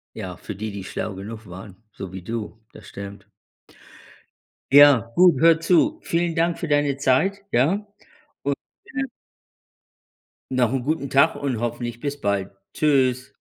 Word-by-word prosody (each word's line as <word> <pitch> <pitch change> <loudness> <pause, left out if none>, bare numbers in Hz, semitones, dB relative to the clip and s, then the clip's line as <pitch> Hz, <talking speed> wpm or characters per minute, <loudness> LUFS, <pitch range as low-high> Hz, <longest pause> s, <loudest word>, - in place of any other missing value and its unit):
Ja, 90 -2 -6
für 105 - -8
die, 110 +1 -4
die 100 -1 -6
schlau 100 - -4
genug 110 +3 -8
waren, 95 +2 -10 0.2
so 95 -1 -8
wie 95 -1 -7
du, 110 +1 -5
das 105 -2 -14
stimmt. 100 0 -9 1.5
Ja, 140 -6 +7
gut, 175 -6 +5
hör 165 0 +5
zu. 305 - +3
Vielen 170 0 0
Dank 170 +1 +1
für 170 - -4
deine 145 -2 +2
Zeit, 170 +10 +1
ja? 170 - +2 0.6
Und, 140 0 -1 0.3
äh 285 -1 -3 1.5
noch 125 -2 +2
‘n 130 -2 -1
guten 145 0 -2
Tag 140 +1 +4
und 130 -5 -2
hoffentlich 120 0 -4
bis 145 +1 -4
bald. 100 -1 -1 0.2
Tschüss. 130 -4 +1
130 Hz, 145 wpm, -23 LUFS, 105-155 Hz, 1.5 s, Ja